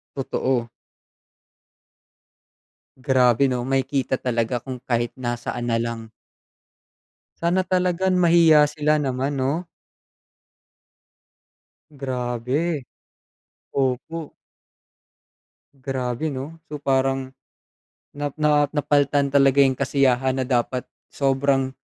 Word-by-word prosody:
Totoo. 130 -3 -1 2.3
Grabe 130 -1 +3
'no? 125 0 -2
Makikita 135 0 0
talaga 120 -1 -1
kung 130 -2 -6
kahit 120 -1 -1
nasaan 120 0 -3
na 115 - +1
lang. 115 -1 -3 1.3
Sana 180 +2 +1
talagang 185 0 +1
mahiya 165 -3 +6
sila 150 +1 +1
naman 135 -1 -1
'no? 140 +7 -1 2.2
Grabe, 130 +3 -2 0.9
opo. 140 +4 -2 1.4
Grabe 130 +1 -3
'no? 145 +4 -7
So, 150 - -5
parang, 135 -1 0 0.8
na 145 -1 -3
na 150 -1 +4
napal'tan 145 -1 +2
talaga 140 -1 +4
yung 135 -1 +3
kasiyahan 130 -1 +1
na - - -1
dapat 125 0 -1 0.2
sobrang, 135 -1 +1
135 Hz, 85 wpm, -23 LUFS, 125-145 Hz, 2.3 s, mahiya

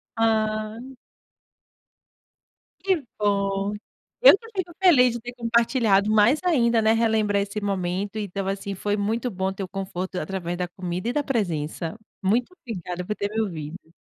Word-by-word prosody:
Ah. 215 -1 0 2.0
Que 370 -7 +1 0.2
bom. 200 0 0 0.5
Eu - - +9
que 455 - -14
fico 350 -2 -2
feliz 255 -10 +6
de 240 - -4
ter 245 +2 -8
compartilhado. 230 -3 +2
Mais 220 +8 +5
ainda, 235 -10 +3
né, 220 +1 +4
relembrar 220 -3 +2
esse 200 +1 -3
momento. 195 +1 -2
Então 195 -2 -3
assim, 195 0 -3
foi 205 +2 -1
muito 225 +5 -1
bom 190 -1 -2
ter 195 0 -5
o - - -5
conforto 190 -1 -5
da 180 - -2
através 175 0 -4
da 180 -1 -2
comida 180 +4 -4
e - - -1
da 295 - 0
presença. 170 - -2 0.3
Muito 235 - +1
obrigada 180 - -5
por 210 - -2
ter 200 - -2
me 220 - +1
ouvido. 165 -3 -6
205 Hz, 160 wpm, -24 LUFS, 190-230 Hz, 2.0 s, Eu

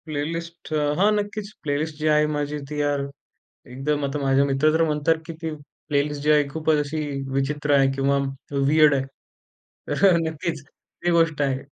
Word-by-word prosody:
Playlist 165 +3 -5 0.3
हां, 205 +2 +5
नक्कीच, 205 0 -3
playlist 150 +1 -2
जी 155 0 -1
आहे 150 0 +4
माझी 145 0 -2
ती 150 0 -4
यार 145 -1 0 0.7
एकदम 145 +3 -1
आता 140 +2 -3
माझे 135 0 +3
मित्र 140 +2 +2
तर 165 +1 +3
म्हणतात, 155 0 +2
की 165 - -6
ती 160 -1 -3 0.4
प्लेलिस्ट 145 0 0
जी 150 - +1
आहे 150 -1 +4
खूपच 155 +1 +1
अशी 150 +2 -4 0.3
विचित्र 145 +2 0
आहे 135 -1 +5
किंवा 135 +1 +2 0.5
वियर्ड 155 0 +5
आहे. 135 - 0 0.9
तर - - +2
अ, - - +5
नक्कीच 160 -1 -3 0.4
ही 175 - +3
गोष्ट 165 -3 +2
आहे. 135 -2 +1
150 Hz, 170 wpm, -23 LUFS, 145-160 Hz, 0.9 s, हां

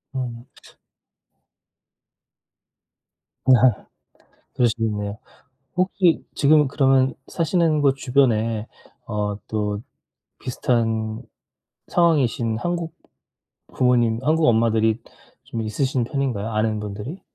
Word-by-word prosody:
음. 125 -1 -5 3.0
아 125 -3 +4 0.7
그러시겠네요. 110 -3 -1 0.6
혹시 185 -1 +2
지금 150 0 +4
그러면 135 -1 +3
사시는 165 -2 +1
곳 140 -2 +3
주변에 115 -5 +1 0.4
어 105 -2 -2
또 105 -1 -2 0.6
비슷한 115 -3 -1 0.7
상황이신 130 -10 +2
한국 170 +2 -3 0.8
부모님, 120 -3 +2
한국 155 +3 +2
엄마들이 110 -1 +2 0.4
좀 115 - -4
있으신 125 +3 -1
편인가요? 120 -6 -2
아는 110 0 0
분들이? 105 - -6
120 Hz, 190 characters per minute, -22 LUFS, 110-140 Hz, 3.0 s, 아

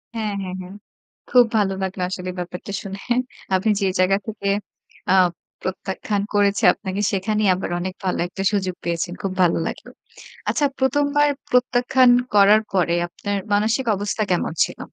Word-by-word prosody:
হ্যাঁ, 215 -2 -2
হ্যাঁ, 185 -1 -5
হ্যাঁ। 185 +2 -10 0.6
খুব 245 -1 +6
ভালো 195 -2 +2
লাগলো 190 0 -4
আসলে 185 -1 -5
ব্যাপারটা 180 +3 -6
শুনে। 195 0 -7 0.6
আপনি 195 +4 +1
যে 195 - +2
জায়গা 190 +2 +4
থেকে 210 -2 -4 0.6
আ - - +5 0.5
প্রত্যাখ্যান 190 +2 -3
করেছে 200 -1 +2
আপনাকে, 195 0 -4
সেখানেই 210 +1 +1
আবার 185 - -4
অনেক 185 +1 -3
ভালো 185 - 0
একটা 195 +2 -5
সুযোগ 190 -3 -1
পেয়েছেন। 170 +1 -2
খুব 195 -2 -2
ভালো 170 - +3
লাগলো। - - -7 0.6
আচ্ছা 290 - +1
প্রথমবার 290 +2 +2 0.2
প্রত্যাখ্যান 250 0 +4 0.3
করার 205 +2 +6
পরে 175 -2 +2
আপনার 200 +3 -4 0.2
মানসিক 220 +5 +1
অবস্থা 205 +2 -2
কেমন 175 -2 0
ছিল? - - -5
200 Hz, 150 wpm, -22 LUFS, 185-215 Hz, 0.6 s, খুব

